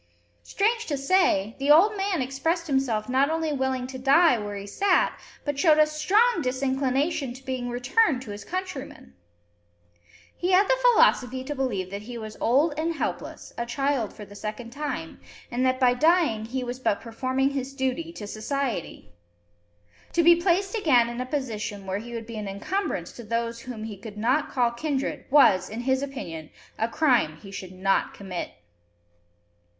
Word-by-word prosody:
Strange 455 Hz, -, 0 dB
to 290 Hz, -, -1 dB
say, 275 Hz, -, +2 dB
the 275 Hz, +1 st, -1 dB
old 370 Hz, +8 st, +6 dB
man 390 Hz, -7 st, 0 dB
expressed 320 Hz, +7 st, -1 dB
himself 265 Hz, -8 st, 0 dB
not 265 Hz, +3 st, +2 dB
only 320 Hz, -1 st, -1 dB
willing 265 Hz, -2 st, -1 dB
to 260 Hz, 0 st, -7 dB
die 280 Hz, +3 st, +5 dB
where 205 Hz, -1 st, -5 dB
he 200 Hz, 0 st, -6 dB
sat, 370 Hz, -, +2 dB, 0.3 s
but 290 Hz, -2 st, -2 dB
showed 315 Hz, -3 st, +5 dB
a 305 Hz, -, +7 dB
strong 380 Hz, +8 st, +2 dB
disinclination 265 Hz, +1 st, 0 dB
to 260 Hz, +1 st, -14 dB
being 255 Hz, -2 st, -3 dB
returned 250 Hz, -, +2 dB
to 215 Hz, -, -8 dB
his 205 Hz, 0 st, -7 dB
countrymen! 365 Hz, -, -6 dB, 1.2 s
He 360 Hz, +1 st, 0 dB
had 390 Hz, +2 st, +5 dB
the -, -, +2 dB
philosophy 260 Hz, -, +4 dB
to 295 Hz, +3 st, -4 dB
believe 215 Hz, -10 st, -2 dB
that 200 Hz, +1 st, -5 dB
he 240 Hz, +3 st, -8 dB
was 215 Hz, -1 st, -7 dB
old 285 Hz, +7 st, +3 dB
and 330 Hz, +1 st, -1 dB
helpless, -, -, -5 dB
a 235 Hz, -, -2 dB
child 275 Hz, -3 st, 0 dB
for 210 Hz, -, -10 dB
the 205 Hz, -, -14 dB
second 215 Hz, +3 st, -6 dB
time, 275 Hz, -, -5 dB, 0.3 s
and 245 Hz, +1 st, 0 dB
that 255 Hz, 0 st, +1 dB
by 250 Hz, -2 st, +5 dB
dying 305 Hz, -6 st, +2 dB
he 255 Hz, +3 st, -3 dB
was 245 Hz, +1 st, -5 dB
but 205 Hz, -5 st, 0 dB
performing 260 Hz, +4 st, -1 dB
his 275 Hz, 0 st, -4 dB
duty 265 Hz, +5 st, -2 dB
to 215 Hz, -, -7 dB
society! 220 Hz, -, -4 dB, 1.0 s
To 340 Hz, -, +3 dB
be 340 Hz, +1 st, +8 dB
placed 365 Hz, +3 st, +1 dB
again 255 Hz, -, +4 dB
in 240 Hz, +1 st, -4 dB
a 255 Hz, -, -4 dB
position 220 Hz, -8 st, -4 dB
where 190 Hz, +1 st, -2 dB
he 235 Hz, +2 st, -8 dB
would 230 Hz, -1 st, -5 dB
be 230 Hz, -1 st, -8 dB
an 210 Hz, -1 st, -4 dB
incumbrance 370 Hz, -, -3 dB
to 240 Hz, -, -10 dB
those 230 Hz, +1 st, -2 dB
whom 235 Hz, -3 st, -7 dB
he 215 Hz, -2 st, -6 dB
could 210 Hz, 0 st, -9 dB
not 255 Hz, +8 st, +1 dB
call 245 Hz, -2 st, +1 dB
kindred 275 Hz, +2 st, -3 dB
was, 200 Hz, -10 st, +5 dB
in 225 Hz, +3 st, -5 dB
his 260 Hz, +1 st, +1 dB
opinion, 170 Hz, -, -6 dB, 0.3 s
a 225 Hz, -, +1 dB
crime 240 Hz, -, +2 dB
he 195 Hz, +4 st, -12 dB
should 185 Hz, -2 st, -7 dB
not 195 Hz, +1 st, 0 dB
commit! 190 Hz, -3 st, -5 dB
260 Hz, 175 wpm, -26 LUFS, 225-305 Hz, 1.2 s, be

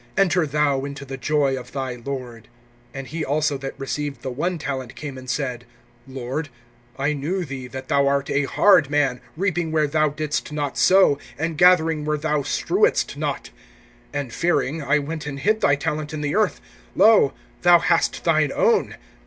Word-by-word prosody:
Enter 180 Hz, -4 st, +3 dB
thou 140 Hz, -2 st, +1 dB
into 140 Hz, 0 st, -6 dB
the 135 Hz, 0 st, -6 dB
joy 140 Hz, 0 st, +1 dB
of 125 Hz, -1 st, -9 dB
thy 130 Hz, -2 st, -3 dB
lord. 120 Hz, -2 st, -7 dB, 0.5 s
(24)And 135 Hz, 0 st, -5 dB
he 160 Hz, +3 st, -4 dB
also 150 Hz, +1 st, 0 dB
that 135 Hz, 0 st, -7 dB
received 140 Hz, 0 st, -4 dB
the 130 Hz, -, -3 dB
one 175 Hz, +8 st, -2 dB
talent 135 Hz, -4 st, -5 dB
came 145 Hz, -3 st, -7 dB
and 130 Hz, 0 st, -10 dB
said: 125 Hz, -3 st, -2 dB, 0.4 s
Lord, 135 Hz, +3 st, -4 dB, 0.5 s
I 140 Hz, +2 st, 0 dB
knew 170 Hz, +6 st, -2 dB
thee 135 Hz, -3 st, -7 dB
that 130 Hz, 0 st, -8 dB
thou 140 Hz, -2 st, +2 dB
art 140 Hz, 0 st, +1 dB
a 145 Hz, 0 st, +1 dB
hard 160 Hz, -1 st, +4 dB
man, 140 Hz, -4 st, +1 dB, 0.2 s
reaping 175 Hz, -3 st, -1 dB
where 155 Hz, -1 st, +2 dB
thou 155 Hz, +1 st, +1 dB
didst 150 Hz, 0 st, -3 dB
not 145 Hz, -2 st, -3 dB
sow, 185 Hz, -7 st, +4 dB, 0.2 s
and 160 Hz, +1 st, -2 dB
gathering 165 Hz, -2 st, +4 dB
where 150 Hz, 0 st, 0 dB
thou 150 Hz, -1 st, 0 dB
strewedst 395 Hz, -, +1 dB
not. -, -, -4 dB, 0.6 s
(25)And 145 Hz, -4 st, -4 dB
fearing, 165 Hz, 0 st, 0 dB
I 140 Hz, +1 st, +2 dB
went 150 Hz, +1 st, -4 dB
and 140 Hz, -1 st, -5 dB
hid 215 Hz, +8 st, +1 dB
thy 140 Hz, -, +4 dB
talent 150 Hz, +2 st, -3 dB
in 150 Hz, -, -4 dB
the 145 Hz, -1 st, -1 dB
earth. -, -, +1 dB, 0.4 s
Lo, 215 Hz, -10 st, +5 dB, 0.3 s
thou 175 Hz, 0 st, +7 dB
hast 165 Hz, -, +1 dB
thine 155 Hz, -4 st, +2 dB
own. -, -, +2 dB
145 Hz, 175 wpm, -22 LUFS, 135-160 Hz, 0.6 s, thou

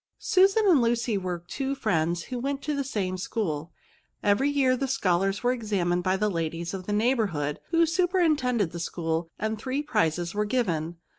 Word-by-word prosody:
Susan 390 Hz, +3 st, +3 dB
and 340 Hz, -9 st, +5 dB
Lucy 235 Hz, -1 st, +1 dB
were 180 Hz, -3 st, -3 dB
two 270 Hz, +6 st, -2 dB
friends, 170 Hz, -7 st, 0 dB
who 250 Hz, -2 st, -5 dB
went 275 Hz, +2 st, -3 dB
to 300 Hz, 0 st, -1 dB
the 280 Hz, -, -1 dB
same 190 Hz, -8 st, -2 dB
school. 165 Hz, -6 st, -3 dB, 0.5 s
Every 205 Hz, +7 st, +3 dB
year 270 Hz, -3 st, +3 dB
the 270 Hz, +2 st, -2 dB
scholars 195 Hz, -5 st, +1 dB
were 245 Hz, -, +3 dB
examined 200 Hz, -7 st, 0 dB
by 185 Hz, +1 st, +1 dB
the 210 Hz, +2 st, +1 dB
ladies 165 Hz, -1 st, -3 dB
of 185 Hz, -2 st, -6 dB
the -, -, -2 dB
neigli 235 Hz, +6 st, +2 dB
bourhood, 145 Hz, -4 st, -3 dB
who 335 Hz, 0 st, +4 dB
superintended 315 Hz, -, +1 dB
the 170 Hz, -, -6 dB
school, 165 Hz, -1 st, -2 dB
and 220 Hz, +1 st, -2 dB
three 265 Hz, +5 st, -2 dB
prizes 175 Hz, -, 0 dB
were 210 Hz, +1 st, 0 dB
given. 175 Hz, -8 st, -1 dB
210 Hz, 180 wpm, -27 LUFS, 175-265 Hz, 0.5 s, and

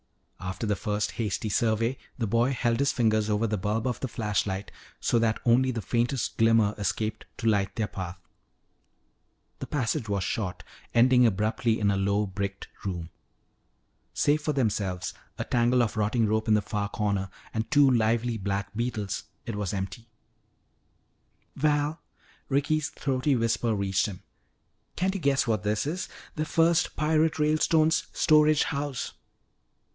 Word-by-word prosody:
After 90 Hz, +3 st, -4 dB
the 105 Hz, -1 st, +1 dB
first 105 Hz, 0 st, -2 dB
hasty 110 Hz, -2 st, -2 dB
survey, 115 Hz, +3 st, +1 dB, 0.2 s
the 115 Hz, -, -1 dB
boy 115 Hz, +5 st, +2 dB
held 120 Hz, -2 st, 0 dB
his 140 Hz, 0 st, +3 dB
fingers 110 Hz, -3 st, +1 dB
over 105 Hz, +2 st, +1 dB
the 105 Hz, -2 st, -1 dB
bulb 105 Hz, +3 st, -1 dB
of 125 Hz, -2 st, -1 dB
the 130 Hz, -, -2 dB
flashlight 100 Hz, -4 st, -2 dB, 0.3 s
so 120 Hz, -, +2 dB
that 115 Hz, -1 st, +1 dB
only 125 Hz, +2 st, +4 dB
the 115 Hz, -4 st, -3 dB
faintest 120 Hz, +2 st, -1 dB
glimmer 115 Hz, -2 st, +4 dB
escaped 110 Hz, +1 st, -2 dB
to 115 Hz, -, -2 dB
light 100 Hz, -3 st, +1 dB
their 110 Hz, -2 st, -1 dB
path. 90 Hz, -2 st, -6 dB, 1.4 s
The -, -, -5 dB
passage 125 Hz, -3 st, -1 dB
was 100 Hz, -2 st, 0 dB
short, 90 Hz, -1 st, -3 dB, 0.3 s
ending 125 Hz, +1 st, +6 dB
abruptly 110 Hz, +2 st, 0 dB
in 100 Hz, -2 st, +2 dB
a 100 Hz, -, 0 dB
low 100 Hz, +2 st, +1 dB
bricked 100 Hz, 0 st, -4 dB, 0.2 s
room. 85 Hz, -4 st, -4 dB, 1.0 s
Save 150 Hz, +1 st, +2 dB
for 150 Hz, -, 0 dB
themselves, 105 Hz, -8 st, -1 dB, 0.2 s
a -, -, -2 dB
tangle 120 Hz, +1 st, +3 dB
of 110 Hz, -, -2 dB
rotting 110 Hz, +2 st, +1 dB
rope 110 Hz, +1 st, 0 dB
in 110 Hz, -1 st, +5 dB
a -, -, +1 dB
far 100 Hz, 0 st, -3 dB
corner, 100 Hz, -2 st, -1 dB, 0.2 s
and 110 Hz, 0 st, -2 dB
two 145 Hz, -2 st, +6 dB
lively 115 Hz, 0 st, +2 dB
black 100 Hz, 0 st, -3 dB
beetles, 110 Hz, -4 st, -2 dB, 0.2 s
it 115 Hz, -, -4 dB
was 105 Hz, -3 st, -2 dB
empty. 95 Hz, +5 st, -5 dB, 1.5 s
"Val," 150 Hz, +2 st, +1 dB, 0.5 s
Ricky's 145 Hz, +2 st, +1 dB
throaty 135 Hz, 0 st, 0 dB
whisper 115 Hz, -1 st, +1 dB
reached 100 Hz, +1 st, +1 dB
him, 95 Hz, -2 st, -8 dB, 0.7 s
"can't 190 Hz, +1 st, 0 dB
you 195 Hz, -, -4 dB
guess 140 Hz, -2 st, +2 dB
what 110 Hz, -5 st, 0 dB
this 105 Hz, +3 st, 0 dB
is? 170 Hz, +5 st, -3 dB, 0.3 s
The 155 Hz, -, -1 dB
first 165 Hz, +2 st, +2 dB
pirate 155 Hz, +1 st, +2 dB
Ralestone's 155 Hz, +1 st, +2 dB
storage 155 Hz, -1 st, +4 dB
house!" 140 Hz, -2 st, -3 dB
115 Hz, 150 wpm, -27 LUFS, 105-130 Hz, 1.5 s, ending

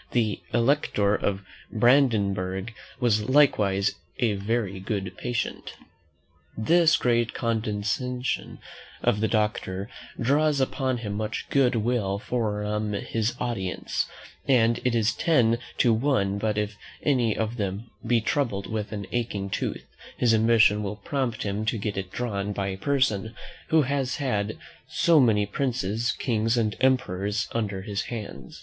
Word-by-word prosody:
The 110 Hz, -6 st, +1 dB
Elector 115 Hz, -4 st, +2 dB
of 100 Hz, -1 st, -1 dB, 0.3 s
Brandenburg 105 Hz, -5 st, +2 dB, 0.3 s
was 110 Hz, -3 st, +1 dB
likewise 105 Hz, -8 st, +3 dB, 0.2 s
a 120 Hz, -5 st, +2 dB
very 100 Hz, -1 st, -2 dB
good 95 Hz, -1 st, -3 dB
patient. 120 Hz, -1 st, -3 dB, 0.8 s
This 165 Hz, +8 st, +4 dB
great 120 Hz, -1 st, +1 dB
condescension 115 Hz, +3 st, -2 dB, 0.5 s
of 105 Hz, -, +2 dB
the 110 Hz, -, +3 dB
doctor 105 Hz, -2 st, -1 dB, 0.3 s
draws 145 Hz, +4 st, +2 dB
upon 130 Hz, -1 st, 0 dB
him 100 Hz, -, -3 dB
much 110 Hz, +1 st, -3 dB
good 130 Hz, -3 st, +3 dB
will 110 Hz, -3 st, 0 dB
from 105 Hz, -2 st, -2 dB
his 110 Hz, +3 st, -1 dB
audience; 105 Hz, -7 st, -2 dB, 0.4 s
and 120 Hz, -3 st, +4 dB
it 125 Hz, -2 st, +1 dB
is 115 Hz, -1 st, +2 dB
ten 120 Hz, -9 st, +3 dB, 0.2 s
to 120 Hz, -3 st, +4 dB
one 110 Hz, -5 st, +1 dB
but 105 Hz, 0 st, 0 dB
if 105 Hz, 0 st, -1 dB, 0.3 s
any 120 Hz, -6 st, +2 dB
of 110 Hz, +2 st, -2 dB
them 100 Hz, +2 st, -4 dB
be 115 Hz, 0 st, +2 dB
troubled 115 Hz, -4 st, -1 dB
with 110 Hz, -1 st, -4 dB
an 100 Hz, -2 st, -4 dB
aching 105 Hz, -5 st, -2 dB
tooth, -, -, -3 dB, 0.3 s
his 120 Hz, -2 st, +3 dB
ambition 110 Hz, -1 st, +4 dB
will 105 Hz, 0 st, -3 dB
prompt 130 Hz, -1 st, -2 dB
him 105 Hz, +1 st, -2 dB
to 110 Hz, +1 st, 0 dB
get 105 Hz, 0 st, -3 dB
it 95 Hz, -1 st, -4 dB
drawn 105 Hz, -4 st, -2 dB
by 100 Hz, -1 st, -2 dB
a 95 Hz, -, -3 dB
person 110 Hz, -3 st, 0 dB, 0.3 s
who 160 Hz, -1 st, +4 dB
has 135 Hz, -1 st, -1 dB
had 110 Hz, -7 st, -1 dB, 0.3 s
so 165 Hz, +1 st, +4 dB
many 110 Hz, -6 st, +4 dB
princes, 115 Hz, -1 st, -1 dB
kings, 115 Hz, -1 st, 0 dB
and 110 Hz, -2 st, +1 dB
emperors 105 Hz, -6 st, +1 dB
under 100 Hz, -4 st, -2 dB
his 100 Hz, -1 st, -3 dB
hands. 105 Hz, -, -7 dB
110 Hz, 140 wpm, -26 LUFS, 100-125 Hz, 0.8 s, This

